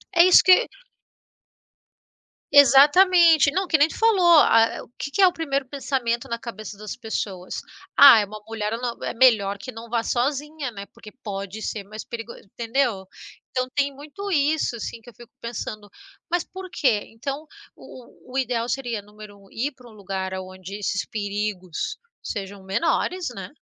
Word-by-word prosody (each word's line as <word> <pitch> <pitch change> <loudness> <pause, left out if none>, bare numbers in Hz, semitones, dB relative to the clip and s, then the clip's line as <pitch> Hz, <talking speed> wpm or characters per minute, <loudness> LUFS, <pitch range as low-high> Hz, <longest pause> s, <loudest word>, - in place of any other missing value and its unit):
É 340 - +8
isso 370 - +7
que 370 -1 +8 1.9
Exatamente, 300 +4 +6
não, 380 +3 -1
que 315 - +3
nem 290 - +6
tu - - -10
falou, 445 -5 +3 0.2
ah, 225 -4 +4
o - - -18
que 280 - -5
que 395 - 0
é 375 - +8
o 360 - 0
primeiro 280 -5 -2
pensamento 255 -4 -2
na 235 - -2
cabeça 215 -3 -9
das 210 0 -7
pessoas? 200 -6 -5 0.4
"Ah, 275 -5 +10
é 205 - 0
uma 215 +2 -10
mulher 220 -1 -3
não 240 -1 -5
é - - -3
melhor 220 -5 +3
que 255 +6 -8
não 230 +1 -10
vá 230 0 0
sozinha, 280 +4 -2
né? 200 -2 -8
Porque 210 - -13
pode 200 0 -6
ser 210 -2 -4
mais 215 +2 -9
perigoso", 230 -2 -8
entendeu? 230 -2 -2 0.4
Então 255 0 -2
tem 285 -1 +1
muito 300 +9 -8
isso, 295 -4 +1
assim, 230 0 -6
que 235 - -14
eu - - -16
fico 240 -1 -15
pensando. 215 -3 -6 0.4
Mas 350 0 0
por 375 0 -10
quê? 225 -7 +1
Então 275 +6 -6 0.3
o 255 0 -15
o 250 - -13
o - - -2
ideal 245 -3 -1
seria 240 -5 -3
número 210 0 -14
1 195 - -20
ir 270 +6 -2
para 250 -2 -17
um - - -16
lugar 190 -2 -5
aonde 185 +1 -8
esses 200 -1 -2
perigos 205 -4 -4 0.3
sejam 195 -1 -6
menores, 335 - -1
né. 190 -2 -7
235 Hz, 175 wpm, -23 LUFS, 210-285 Hz, 1.9 s, Ah